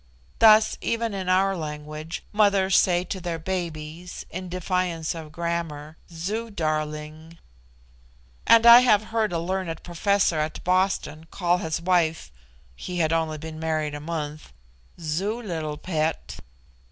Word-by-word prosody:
Thus, 215 -1 +6
even 230 -1 -1
in 190 -2 -3
our 190 +1 +3
language, 155 0 -6
mothers 200 -3 +3
say 175 -1 +4
to 185 +1 -5
their 170 -1 -3
babies, 170 -1 -5
in 185 0 -6
defiance 180 -2 -1
of 160 -2 -9
grammar, 160 -2 -4 0.2
"Zoo 205 +8 -4
darling;" 155 -2 -4 1.1
and 230 0 +7
I 235 +1 +11
have 215 -4 +4
heard 220 -3 +1
a 170 - -1
learned 175 0 -3
professor 180 -1 +1
at 155 +1 -3
Boston 180 -4 0
call 175 -1 +1
his 160 -1 -2
wife 165 - +1 0.4
(he 180 - -6
had 160 -2 +2
been 165 - +1
only 160 0 -5
married 155 -1 -2
a 145 - -5
month) 150 -1 -5 0.5
"Zoo 180 +8 -2
little 160 -9 -4
pet." 160 -2 -2
170 Hz, 135 wpm, -25 LUFS, 155-190 Hz, 1.1 s, I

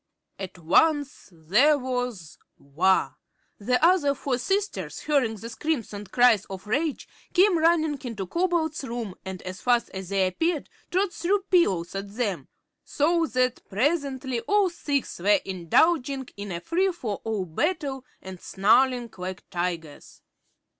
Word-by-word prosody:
At 190 -1 -7
once 285 - +2
there 210 - +3
was 245 - -4 0.2
war. 170 +7 +1 0.4
The 250 +5 +1
other 330 -6 +4
four 260 -2 -2
Princesses, 395 +10 -2
hearing 275 -7 +1
the 220 +2 -8
screams 240 0 -3
and 205 -1 -8
cries 240 -5 +4
of 190 -1 -8
rage, 285 +7 -1 0.3
came 370 -1 +4
running 315 -3 +2
into 225 -6 -4
Cobalt's 335 - 0
room 235 -6 -4
and 190 -1 -6
as 185 0 -7
fast 245 -1 +2
as 190 -1 -7
they 195 -1 +2
appeared 310 - -1 0.2
Trot 375 +1 0
threw 390 +3 +1
pillows 200 - +2
at 200 +1 -6
them, 210 -7 -2 0.4
so 330 +3 +1
that 255 -2 0
presently 265 - 0
all 405 -3 +3
six 285 - -2
were 200 +2 +4
indulging 265 - +1
in 200 -1 -6
a 170 0 -4
free 370 - +1
for 225 - -4
all 215 -4 -2
battle 275 - -2 0.2
and 190 -2 -9
snarling 240 +4 +2
like 185 0 -6
tigers. 170 -4 -5
250 Hz, 140 wpm, -26 LUFS, 190-310 Hz, 0.4 s, other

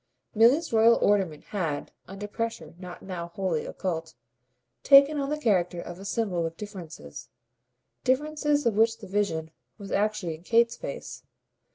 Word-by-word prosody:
Milly's 240 +8 +4
royal 225 +1 +6
ornament 190 -7 +1
had 165 -8 -3 0.2
under 195 +2 -7
pressure 230 +2 -4
now 180 -1 -8
not 170 -3 -6
wholly 185 -5 -1
occult 165 -4 -4 0.7
taken 280 +2 +7
on 275 0 -2
the 300 - -1
character 180 -10 +1
of 175 +1 -8
a 195 - -9
symbol 200 -5 -1
of 165 0 -9
differences, 170 - -9 0.7
differences 295 +2 +1
of 235 - +3
which 225 0 +3
the 225 - -11
vision 185 -5 -1 0.3
was 200 -2 -9
actually 205 -4 0
in 155 - -11
Kate's 230 +5 +3
face. - - -7
205 Hz, 150 wpm, -27 LUFS, 175-235 Hz, 0.7 s, taken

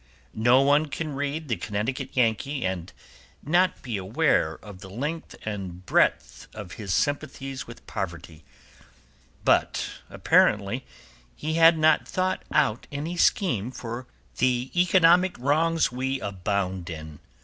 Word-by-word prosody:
No 120 +4 +4
one 145 +3 +3
can 150 +1 -4
read 145 +3 -3
The 115 -5 -1
Connecticut 105 +8 -3
Yankee 125 +2 +1
and 95 -1 -3 0.5
not 175 +5 +2
be 120 -5 -3
aware 95 - +1
of 100 -3 -10
the 95 0 -11
length 145 - -5
and 95 -4 -5
breadth - - +1
of 105 -4 -8
his 100 -4 -6
sympathies 135 +1 -2
with 115 - -12
poverty, 85 -5 -6 1.0
but - - +2 0.2
apparently 105 +5 +2 0.5
he 155 +1 -3
had 165 0 +6
not 155 0 +3
thought 185 0 -1
out 135 -7 +1
any 150 +5 -4
scheme 140 - +2
for 120 0 -7
righting - - -33 0.3
the 125 0 +1
economic 180 0 +4
wrongs 160 +5 +2
we 130 +2 -2
abound 95 -3 -2
in. 80 -2 -8
125 Hz, 130 wpm, -26 LUFS, 100-155 Hz, 1.0 s, had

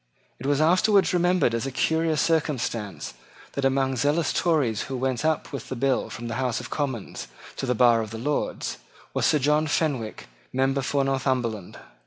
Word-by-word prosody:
It 130 - -4
was 145 0 +2
afterwards 185 +5 +4
remembered 175 -7 +3
as 115 +3 -1
a - - -3
curious 160 +3 +1
circumstance 125 - -1 0.4
that, 140 - -3
among 135 -1 +1
zealous 145 +4 +1
Tories 145 - +1
who 135 - -3
went 130 0 -1
up 155 -2 0
with 135 - -6
the 130 - -3
bill 130 +1 0
from 120 0 -6
the 115 0 -3
House 125 -2 0
of - - -8
Commons 130 - -3 0.3
to 135 - -3
the 125 - +1
bar 120 -1 +5
of 110 - -5
the 110 - -6
Lords, 145 +6 -2 0.3
was - - +2
Sir 150 - +4
John 150 +2 +2
Fenwick, 145 -7 -1 0.2
member 135 +1 +1
for 140 +1 0
Northumberland. 130 -7 -1
135 Hz, 180 wpm, -25 LUFS, 120-150 Hz, 0.4 s, bar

